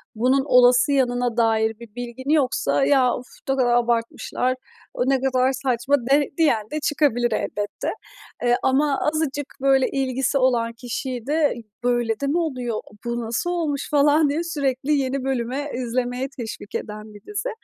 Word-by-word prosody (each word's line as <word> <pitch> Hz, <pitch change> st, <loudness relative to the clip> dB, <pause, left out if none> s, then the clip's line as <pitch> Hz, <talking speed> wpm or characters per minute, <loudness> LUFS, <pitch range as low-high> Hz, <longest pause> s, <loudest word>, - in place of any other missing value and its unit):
bunun 255 Hz, +4 st, +2 dB
olası 250 Hz, +1 st, +5 dB
yanına 245 Hz, -3 st, +1 dB
dair 220 Hz, -1 st, +2 dB
bir 235 Hz, -2 st, -13 dB
bilgin 245 Hz, +2 st, -6 dB
yoksa 255 Hz, -, +2 dB
"Ya, 260 Hz, -3 st, +4 dB
of 250 Hz, -, -8 dB, 0.2 s
ne 270 Hz, -, +3 dB
kadar 255 Hz, -2 st, +2 dB
abartmışlar, 240 Hz, +1 st, 0 dB, 0.4 s
o 250 Hz, +2 st, 0 dB
ne 265 Hz, -1 st, +2 dB
kadar 260 Hz, -1 st, +2 dB
saçma." 260 Hz, +1 st, +1 dB, 0.2 s
de 290 Hz, 0 st, +4 dB
diyen 230 Hz, -10 st, +2 dB
de 305 Hz, -, -2 dB
çıkabilir 285 Hz, -6 st, +1 dB
elbette. 205 Hz, 0 st, -3 dB, 0.6 s
Eee, 240 Hz, 0 st, +4 dB
ama 275 Hz, +1 st, +2 dB
azıcık, 300 Hz, -2 st, -1 dB, 0.2 s
böyle, 270 Hz, -1 st, +4 dB
ilgisi 265 Hz, 0 st, 0 dB
olan 240 Hz, -3 st, +2 dB
kişiyi 245 Hz, 0 st, -5 dB
de 300 Hz, 0 st, +2 dB, 0.3 s
"Böyle 240 Hz, -3 st, +1 dB
de 280 Hz, -, -1 dB
mi 300 Hz, +5 st, +1 dB
oluyor? 250 Hz, -9 st, -2 dB, 0.2 s
Bu 235 Hz, 0 st, -2 dB
nasıl 230 Hz, +10 st, -2 dB
olmuş?" 310 Hz, -5 st, -2 dB
falan 295 Hz, 0 st, +4 dB
diye 315 Hz, +4 st, -1 dB
sürekli 285 Hz, -3 st, -1 dB
yeni 270 Hz, -1 st, 0 dB
bölüme 265 Hz, +2 st, -2 dB
izlemeye 250 Hz, +1 st, -2 dB
teşvik 220 Hz, -3 st, -7 dB
eden 210 Hz, 0 st, -6 dB
bir 205 Hz, -, -13 dB
dizi. 420 Hz, +4 st, -3 dB
255 Hz, 155 wpm, -23 LUFS, 240-280 Hz, 0.6 s, olası